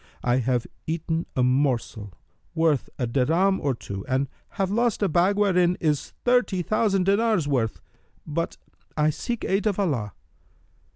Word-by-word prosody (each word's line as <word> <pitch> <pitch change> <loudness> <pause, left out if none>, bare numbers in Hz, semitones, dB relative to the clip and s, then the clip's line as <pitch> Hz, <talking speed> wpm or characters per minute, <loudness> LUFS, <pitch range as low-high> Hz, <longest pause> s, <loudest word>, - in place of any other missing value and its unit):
I 120 0 +2
have 125 -1 0 0.2
eaten 165 +1 -2
a 125 - +2
morsel 125 -6 0 0.4
worth 160 -4 +2
a 125 - -1
dirham 165 +11 +2
or 140 -3 0
two 100 -4 -7
and 135 +1 +1 0.3
have 195 -1 0
lost 230 -1 +1
a - - +4
bag 180 +4 +2
wherein 180 -3 +3
is 150 -3 -1
thirty 245 -7 +2
thousand 205 -1 +1
dinars' 200 -4 +2
worth: 120 -6 0 0.5
but 165 +2 -3 0.4
I 150 0 +3
seek 235 +9 -4
aid 195 +3 +1
of 205 - 0
Allah!" 130 - -1
160 Hz, 150 wpm, -25 LUFS, 130-195 Hz, 0.5 s, a